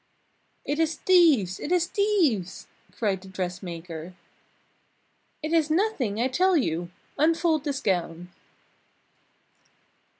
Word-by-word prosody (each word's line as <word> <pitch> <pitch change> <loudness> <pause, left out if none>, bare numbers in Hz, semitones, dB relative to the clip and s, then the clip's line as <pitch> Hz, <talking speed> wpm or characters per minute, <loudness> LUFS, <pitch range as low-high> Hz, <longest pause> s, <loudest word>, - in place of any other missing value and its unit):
"It 295 +2 -2
is 325 0 +1
thieves! 300 - +3
It 315 - -5
is 355 -1 +3
thieves!" 355 - 0 0.3
cried 200 -5 -2
the 190 - -13
dressmaker. 180 -2 -6 1.3
"It 310 +2 -2
is 320 -2 +3
nothing 310 - 0
I 245 - +2
tell 365 +7 +2
you 175 - -1 0.3
unfold 320 0 +2
this 275 -2 -2
gown." 175 -2 -2
265 Hz, 105 wpm, -26 LUFS, -, 1.3 s, thieves